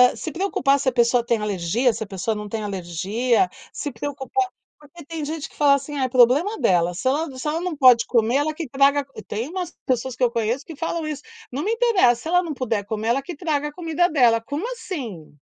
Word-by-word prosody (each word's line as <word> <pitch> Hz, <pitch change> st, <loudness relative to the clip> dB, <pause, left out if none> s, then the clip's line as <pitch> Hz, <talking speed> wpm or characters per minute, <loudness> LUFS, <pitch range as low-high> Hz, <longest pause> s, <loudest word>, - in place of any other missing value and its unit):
se 320 Hz, -, -5 dB
preocupar 335 Hz, -7 st, +1 dB
se 265 Hz, -1 st, +2 dB
a -, -, -7 dB
pessoa 240 Hz, 0 st, +3 dB
tem 235 Hz, -1 st, +2 dB
alergia, 210 Hz, +4 st, 0 dB
se 220 Hz, +1 st, -4 dB
a -, -, -10 dB
pessoa 195 Hz, +3 st, -2 dB
não 210 Hz, 0 st, -6 dB
tem 220 Hz, 0 st, -3 dB
alergia, 200 Hz, -, 0 dB, 0.2 s
se 290 Hz, -, -4 dB
preocupar 290 Hz, +9 st, -2 dB, 0.3 s
porque 300 Hz, +2 st, -14 dB
tem 315 Hz, 0 st, -5 dB
gente 310 Hz, 0 st, -5 dB
que -, -, -21 dB
fala 285 Hz, -2 st, +5 dB
assim: 280 Hz, +2 st, -5 dB
"Ai 265 Hz, -, +1 dB
é 255 Hz, -, -3 dB
problema 270 Hz, -, +4 dB
dela, 175 Hz, -1 st, +2 dB
se 220 Hz, -, -3 dB
ela 295 Hz, +3 st, 0 dB
se 255 Hz, -, -5 dB
ela 315 Hz, +3 st, -1 dB
não 360 Hz, -2 st, -3 dB
pode 255 Hz, -5 st, +6 dB
comer 235 Hz, +1 st, +2 dB
ela 310 Hz, +2 st, 0 dB
que 315 Hz, -2 st, -5 dB
traga", 275 Hz, +2 st, +3 dB, 0.2 s
tem 225 Hz, +4 st, -3 dB
umas 360 Hz, -1 st, -4 dB
pessoas 255 Hz, -1 st, -1 dB
que 255 Hz, -, -2 dB
eu 240 Hz, -, +5 dB
conheço 235 Hz, +2 st, -1 dB
que 325 Hz, -, -9 dB
falam 325 Hz, +1 st, -3 dB
isso, 295 Hz, -1 st, -5 dB, 0.3 s
"Não 280 Hz, +5 st, -3 dB
me 430 Hz, -, 0 dB
interessa, 400 Hz, -, +3 dB
se -, -, -6 dB
ela 355 Hz, +2 st, +3 dB
não 325 Hz, -, -4 dB
puder 230 Hz, -6 st, -2 dB
comer 220 Hz, +1 st, -3 dB
ela 270 Hz, +3 st, +2 dB
que 345 Hz, +2 st, -7 dB
traga 295 Hz, -2 st, -1 dB
a 295 Hz, -, -15 dB
comida 345 Hz, 0 st, +1 dB
dela", 240 Hz, -7 st, +4 dB
como 290 Hz, -, -4 dB
assim? 230 Hz, -, -7 dB
275 Hz, 230 wpm, -23 LUFS, 230-315 Hz, 0.3 s, pode